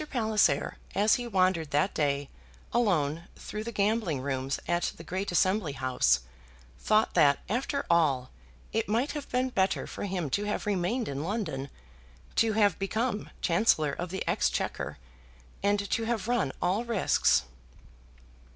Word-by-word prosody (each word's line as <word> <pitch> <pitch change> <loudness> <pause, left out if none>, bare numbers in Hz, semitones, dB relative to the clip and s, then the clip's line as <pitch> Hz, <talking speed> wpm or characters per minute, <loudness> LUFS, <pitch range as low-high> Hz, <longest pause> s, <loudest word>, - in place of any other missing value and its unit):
Palliser, 220 -4 +1 0.2
as 210 +2 +4
he 240 - -4
wandered 185 -6 +2
that 165 +8 +1
day 145 -2 0 0.5
alone 170 -9 +1
through 215 0 -6
the 235 - -5
gambling 205 - 0
rooms 135 0 -2
at 175 0 0
the 165 - -9
great 185 +4 -3
Assembly 185 -3 +2
House, 130 - +2 0.6
thought 215 +1 +2
that, 140 -1 +5
after 275 +5 -1
all, 140 -7 +2 0.4
it 225 -1 0
might 235 +7 +1
have 295 -2 -6
been 255 +1 +1
better 190 -5 +1
for - - -5
him 180 -5 -2
to 205 - 0
have 210 - -2
remained 205 +4 0
in 140 0 -3
London, 160 -9 -3 0.7
to 225 -1 +3
have 205 -3 +3
become 220 +3 -1
Chancellor 165 -5 +3
of 175 +4 -4
the 190 +2 -4
Exchequer, - - -1 0.6
and 200 0 +1
to 225 - +1
have 225 -2 -1
run 235 - +1
all 190 +6 +1
risks. 230 - +2
195 Hz, 145 wpm, -29 LUFS, 155-220 Hz, 0.7 s, that